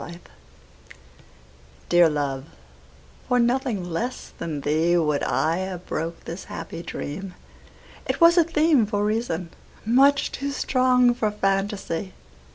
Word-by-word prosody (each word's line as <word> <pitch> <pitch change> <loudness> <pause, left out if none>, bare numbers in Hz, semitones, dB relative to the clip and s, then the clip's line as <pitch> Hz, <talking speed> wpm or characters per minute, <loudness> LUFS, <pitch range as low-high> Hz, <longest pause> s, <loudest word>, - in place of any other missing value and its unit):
The - - -7
Dream 170 - -13 1.7
DEAR 175 -1 +6
love, 140 -3 -2 0.8
for 250 - +2
nothing 240 -6 0
less 225 +10 -4
than 155 -3 -4
theeWould 155 0 +2
I 160 +2 +1
have 185 -1 -5
broke 165 +1 -4
this 170 +3 -7
happy - - -7
dream; 180 +3 -6 0.7
It - - -1
was 335 0 +7
a 345 - +6
themeFor 295 -11 +2
reason, 210 -6 -2 0.3
much 275 +5 +4
too 280 0 -4
strong 255 -2 +3
for 220 -3 0
fantasy. 195 -3 -2
195 Hz, 120 wpm, -24 LUFS, 170-250 Hz, 1.7 s, was